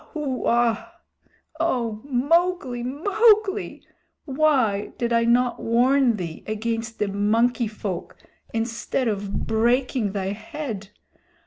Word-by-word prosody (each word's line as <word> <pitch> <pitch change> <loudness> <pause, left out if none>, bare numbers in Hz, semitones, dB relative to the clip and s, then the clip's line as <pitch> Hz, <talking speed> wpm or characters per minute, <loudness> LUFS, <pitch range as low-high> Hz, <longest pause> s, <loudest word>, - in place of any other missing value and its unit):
Wahooa! 240 -5 0 0.7
O 235 -9 -1
Mowgli, 285 0 +1
Mowgli! 405 - +2 0.4
Why 260 -8 +1
did 235 -1 -1
I 230 0 +3
not 240 +1 +2
warn 245 +1 +3
thee 170 -5 -6
against 225 +1 -3
the 210 - 0
Monkey 225 +4 +1
Folk 205 -4 -6 0.3
instead 230 +2 -2
of 200 -2 -2
breaking 235 -1 +1
thy 195 -2 -2
head? 220 - -6
235 Hz, 100 wpm, -24 LUFS, 215-275 Hz, 0.7 s, I